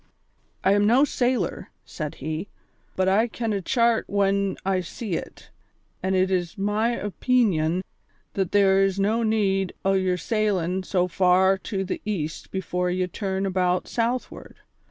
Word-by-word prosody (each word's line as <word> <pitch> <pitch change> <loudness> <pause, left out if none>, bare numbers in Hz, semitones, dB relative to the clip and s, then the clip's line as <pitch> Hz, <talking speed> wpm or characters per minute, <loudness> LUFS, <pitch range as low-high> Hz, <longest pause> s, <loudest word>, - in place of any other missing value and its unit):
"I 190 - +4
am 205 +1 +3
no 245 +5 +5
sailor," 245 - -1 0.2
said 150 -2 -6
he, 155 +6 -4 0.5
"but 185 0 +1
I 210 +5 +3
ken 230 -1 -3
a 200 - -1
chart 235 +3 +2
when 200 -1 +1
I 190 -1 +1
see 205 +3 -6
it, - - -6 0.5
an' 190 +1 0
it 185 0 +2
is 175 +1 -1
my 210 +4 0
opeenion 190 -6 +1 0.5
that 190 -3 -1
there 195 -1 +4
is 195 0 0
no 215 +4 +2
need 195 -4 +1
o' 195 - +3
your 185 -1 +1
sailin' 190 -2 0
so 180 -1 0
far 185 +1 +4
to 195 -1 -3
the 190 - -4
east 160 -8 -4
before 180 -1 -2
ye 185 +1 0
turn 190 +1 -3
about 180 -1 0
southward. 240 +2 -3
195 Hz, 155 wpm, -24 LUFS, 185-215 Hz, 0.5 s, no